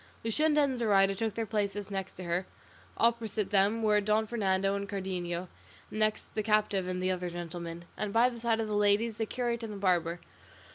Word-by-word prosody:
Luscinda 300 +6 +3
and 265 -3 +1
Zoraida 195 -4 +4
took 220 +1 -2
their 230 - -1
places 205 -1 -2
next 195 -1 -4
her, 180 0 -2 0.5
opposite 230 -2 +1
to - - -12
them 205 +3 +3
were 210 -1 +4
Don 215 +2 +2
Fernando 195 -3 +1
and 200 0 -3
Cardenio, 180 -2 -3 0.4
and 215 - -4
next 215 0 0
the 215 - 0
captive 210 -3 +1
and 185 0 -2
the 185 - +2
other 180 -1 -2
gentlemen, 170 0 -6
and 210 -1 -3
by 230 +3 +5
the 240 -2 -5
side 230 -1 +1
of 225 - -1
the 210 - -3
ladies, 205 +2 +2
the 225 - 0
curate 240 -1 -2
and 225 -2 -5
the - - -6
barber. 175 -3 +1
205 Hz, 200 wpm, -30 LUFS, 185-225 Hz, 0.5 s, by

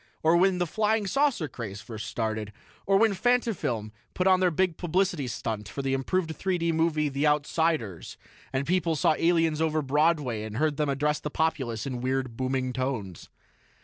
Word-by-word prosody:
Or 160 +2 +5
when 185 +1 +4
the 175 - +1
'Flying 215 +4 0
Saucer' 275 - +1
craze 110 -6 -7
first 110 -1 -7
started. 110 -2 -3 0.4
Or 195 0 +5
when 220 0 +4
Fantafilm 195 - 0 0.2
put 180 - 0
on 185 -1 +5
their 185 -1 +3
big 175 +1 +1
publicity 175 -4 0
stunt 110 -2 -4
for 140 - -5
the 135 0 0
improved 160 +5 -1
3 190 -1 -1
D 170 0 0
movie, 160 -2 +1
'The 140 +2 0
Outsiders', 150 - 0 0.3
and 135 +1 -1
people 170 0 +1
saw 155 - +3
the - - -5
aliens 165 -2 +2
over 155 -1 +1
Broadway 145 -4 +1
and 110 0 -6
heard 150 0 +1
them 150 -1 0
address 150 +2 0
the 150 - -4
populace 145 -8 -1
in 125 -3 -4
weird, 130 -2 -1
booming 130 0 -1
tones. 120 - -4
150 Hz, 180 wpm, -27 LUFS, 130-175 Hz, 0.4 s, Or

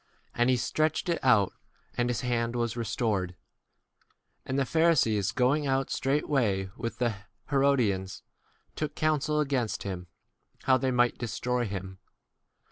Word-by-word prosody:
And 120 +1 +2
he 130 - +4
stretched 155 +8 0
[it] 170 - +1
out, 110 -7 +4 0.4
and 120 0 0
his 120 - -1
hand 120 -2 0
6 - - -3
was 120 -1 -1
restored/ 105 -5 -1 1.1
And 130 - -1
the 135 - +2
Pharisees 125 - +3
going 140 +4 +2
out 135 0 0
straightway 125 -9 0
with 115 - -5
the 120 -4 0 0.3
Herodians, 125 -10 +1 0.5
took* 150 -1 -3
1 - - -41
counsel 150 -1 +1
against 135 -6 -1
him, 90 -2 -5 0.6
how 130 -1 +4
they 130 0 0
might 120 -1 +2
destroy 125 +1 -1
him. 95 -1 -6
125 Hz, 140 wpm, -28 LUFS, 110-140 Hz, 1.1 s, he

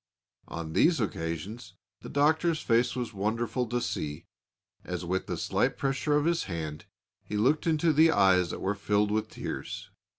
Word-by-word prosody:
On 85 -2 -6
these 165 - +4
occasions 95 +1 -4 0.3
the - - -8
Doctor's 160 +3 +2
face 120 -1 +2
was 120 -3 -3
wonderful 115 +4 -1
to 120 +2 -1
see 75 -10 -4 0.6
as, 90 -1 -4
with 95 +2 -1
the - - -3
silent - - 0
pressure 140 +2 0
of 150 - +1
his 170 0 +1
hand, 80 -4 -5 0.4
he 105 - -4
looked 140 +10 +2
into 160 0 +3
the 160 +2 +6
eyes 95 - +4
that - - -5
were 95 - 0
filled 105 0 +1
with 110 0 0
tears. - - -6
110 Hz, 165 wpm, -29 LUFS, 95-145 Hz, 0.6 s, the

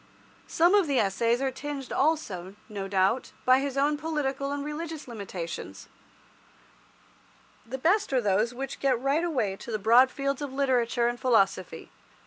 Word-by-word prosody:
Some 345 +4 +3
of 405 -5 +4
the 280 -2 +1
Essays 230 +4 +1
are 265 - 0
tinged 275 0 -6
also, 205 - -1
no 200 -2 -5
doubt, 195 +5 +1
by 255 +1 +6
his 275 0 -3
own 295 +2 +2
political 280 -3 -2
and 285 0 -3
religious 310 0 -6
limitations. 185 - -7 1.8
The 260 +3 -4
best 365 +9 +2
are 260 - +3
those 210 +1 +1
which 270 +2 -6
get 265 -4 +1
right 275 +6 +1
away 265 - 0
into 195 +5 -9
the 215 - 0
broad 235 +5 +5
fields 275 +1 -3
of 285 -2 -4
literature 250 -3 +1
and 240 0 -2
philosophy. 195 -8 +1
260 Hz, 155 wpm, -27 LUFS, 220-285 Hz, 1.8 s, by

